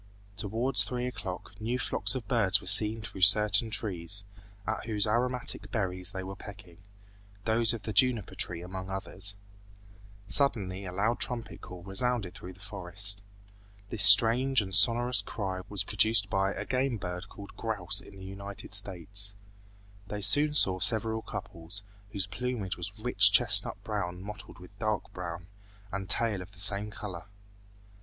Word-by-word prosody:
Towards 115 +6 +2
three 125 -1 -3
o'clock 100 -7 -7
new 120 +3 -3
flocks 130 - +1
of 120 -5 -6
birds 105 -4 +1
were - - -15
seen 105 +3 +9
through 95 -3 -9
certain 105 +3 +6
trees, 100 -3 -1 0.4
at 110 +1 -5
whose 105 -3 0
aromatic 120 -2 -2
berries 95 -3 -3
they 95 -1 -7
were 95 +1 -8
pecking, 100 -3 -14 0.7
those 115 0 +2
of 115 -2 -5
the 110 +1 -6
juniper 125 -6 0
tree 85 -1 -2
among 95 +1 -8
others. 95 +1 -3 0.9
Suddenly 100 -7 0
a 90 - -7
loud 105 +6 -2
trumpet 120 -2 -4
call 90 -1 -12
resounded 100 0 -1
through 90 +1 -11
the 95 - -22
forest. 100 0 -3 0.7
This 110 -3 +1
strange 115 +7 +6
and 95 -3 -5
sonorous 120 +6 +4
cry 95 -4 -6
was 100 -3 0
produced 105 -1 +2
by 95 0 0
a - - -7
game 130 -2 -2
bird 90 0 -8
called 100 0 -13
grouse 105 -6 -1
in 100 - -16
the 95 -1 -12
United 100 +1 -8
States. 100 +1 0 0.7
They 105 0 -6
soon 150 +8 +5
saw 95 -9 +2
several 110 +3 +1
couples, 85 0 -8 0.3
whose 100 -2 -2
plumage 110 -2 -5
was 90 +2 -6
rich 105 -3 +3
chestnut 105 -2 +4
brown 95 -4 -5
mottled 105 0 -10
with 90 +2 -16
dark 110 -2 -4
brown, 85 -1 -8 0.5
and 95 -1 -6
tail 110 -2 +1
of 95 +2 -13
the 100 - -14
same 100 +2 +2
color. 100 -6 -9
100 Hz, 155 wpm, -28 LUFS, 95-115 Hz, 0.9 s, seen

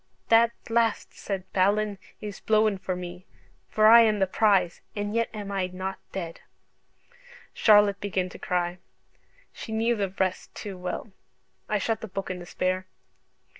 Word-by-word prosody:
'That 230 0 +6 0.2
blast,' 230 -1 +1
said 195 -2 -4
Balin, 200 +1 +2 0.2
'is 205 -2 -6
blowen 215 -2 +2
for 185 -1 -3
me, 180 0 -8 0.4
for 215 - +2
I 230 +2 +10
am 215 -2 +3
the 195 - +3
prize, 190 -3 +2
and 205 0 -3
yet 230 0 +1
am 205 -2 -6
I 195 -2 0
not 185 +1 -5
dead.'" 170 -3 -6 1.1
Charlotte 205 -2 +5
began 190 -2 -1
to - - -11
cry: 180 0 -1 0.7
she 220 - -8
knew 225 +2 +1
the 200 -3 -1
rest 185 -1 -2
too 200 -2 -6
well. 180 +3 -5 0.6
I 210 - +2
shut 220 +2 -1
the 220 - -5
book 195 -1 -4
in 180 - -5
despair. 185 +1 -2
200 Hz, 155 wpm, -26 LUFS, 185-215 Hz, 1.1 s, I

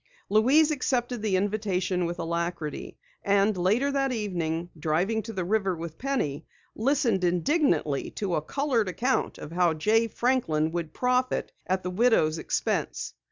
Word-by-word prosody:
Louise 270 +9 +4
accepted 250 -4 -1
the 210 -3 +1
invitation 190 -2 0
with 175 +1 -4
alacrity, 170 -2 -3 0.3
and 200 +1 +3
later 210 +10 +2
that 275 -1 0
evening, 175 -7 -2
driving 170 +8 0
to 225 - -7
the 185 -4 -3
river 195 -1 +1
with 165 -1 -7
Penny, 165 - -2 0.3
listened 240 -5 +1
indignantly 175 - +1
to 195 -4 -3
a 155 - +1
colored 240 - 0
account 240 +10 0
of 150 - -9
how 175 -1 +2
Jay 220 +8 +2
Franklin 220 -12 0
would 170 -2 -3
profit 250 +3 0 0.2
at 185 0 0
the 180 - -3
widow's 180 -7 +3
expense. - - -2
195 Hz, 145 wpm, -27 LUFS, 170-245 Hz, 0.3 s, Louise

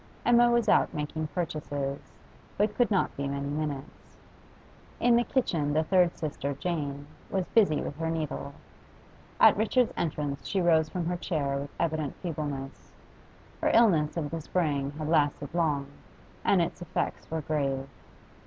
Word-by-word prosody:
Emma 240 0 +6
was 235 -1 +2
out - - +4
making 155 +1 -3
purchases, 145 -5 -3 0.6
but 210 +1 +2
could 245 +1 +2
not 195 -4 +1
be 140 0 -2
many 140 0 -3
minutes. 145 -2 -5 0.8
In 240 -1 +4
the 240 - +4
kitchen 165 - 0
the 155 +1 +3
third 180 +1 +3
sister, 145 -3 -3
Jane, 145 -3 -3 0.2
was 190 -2 -1
busy 195 -10 +4
with - - -5
her 165 0 -2
needle; 155 -3 -3 0.8
at - - +8
Richard's 225 +4 +2
entrance 150 -3 -3
she 195 - 0
rose 160 -3 +3
from 175 0 -3
her 175 +1 -1
chair 145 -6 -1
with 140 +1 -5
evident 155 -3 -1
feebleness: 145 -5 -5 0.7
her - - +3
illness 175 -10 +4
of 150 -3 -2
the 165 -1 -3
spring 145 -5 0
had 155 -1 -3
lasted 145 -2 +1
long, 155 -5 +1 0.6
and 185 -3 +4
its 170 - -5
effects 175 - -3
were 160 0 -2
grave. 140 -3 -1
155 Hz, 155 wpm, -28 LUFS, 145-175 Hz, 0.8 s, at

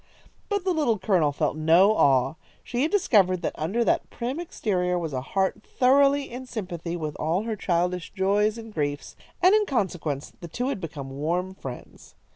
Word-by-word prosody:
But 405 -3 0
the 375 -1 +1
Little 290 -9 +1
Colonel 180 -7 +2
felt 145 - -1
no 165 +6 +5
awe. 135 -4 +3 0.3
She 245 0 -2
had 305 - +2
discovered 200 - +3
that - - -1
under 195 +10 -1
that - - +1
prim 250 +6 -4
exterior 180 - -1
was 165 -4 -3
a 130 - -2
heart 190 +8 -1
thoroughly 275 +1 +3
in 255 +2 -7
sympathy 175 -7 -5
with 155 -3 -4
all 170 +6 0
her 225 -1 -3
childish 180 -2 -1
joys 205 +3 +1
and 225 -1 -9
griefs, 145 -3 -3 0.3
and 365 +2 +7
in 425 -1 +3
consequence 170 - -2
the 170 - -8
two 245 +10 -2
had 255 -9 -3
become 145 -5 -6
warm 170 +7 -2
friends. 130 -9 -10
190 Hz, 180 wpm, -25 LUFS, 160-240 Hz, 0.3 s, and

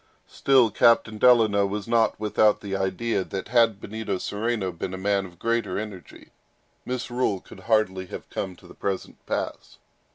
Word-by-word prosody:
Still, 130 -5 +3
Captain 110 -1 +3
Delano 110 -5 +5
was 100 +1 -4
not 115 -2 +2
without 105 0 +2
the 100 -2 -4
idea, 95 +2 -1
that 95 +2 -6
had 115 -4 +3
Benito 110 +1 -4
Cereno 105 0 -2
been 90 +2 -5
a - - -6
man 100 0 0
of 85 -1 -17
greater 115 -2 -1
energy, 100 -4 -8 0.5
misrule 125 -5 -2
would - - -12
hardly 95 -3 +1
have - - -8
come 95 -2 -4
to - - -19
the - - -13
present 95 -1 -4
pass. - - -4
105 Hz, 160 wpm, -25 LUFS, 95-115 Hz, 0.5 s, Delano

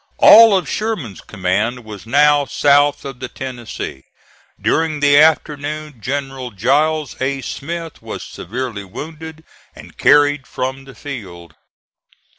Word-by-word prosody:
All 220 -2 +8
of 185 - -4
Sherman's 195 - -4
command 105 +7 -2
was 105 0 -10
now 145 +3 +4
south 145 +1 +2
of 135 -3 -7
the 130 - -5
Tennessee. 120 - -7 0.5
During 160 -2 0
the 145 0 +4
afternoon 150 -1 +1
General 135 0 -4
Giles 145 +8 0
A. 135 +1 -1
Smith 165 +6 -6
was - - -7
severely 115 +1 -6
wounded 160 - -9 0.3
and - - -14
carried 145 -2 +4
from 130 +1 -4
the 135 -2 -13
field. 95 - -9
140 Hz, 120 wpm, -18 LUFS, 120-150 Hz, 0.5 s, All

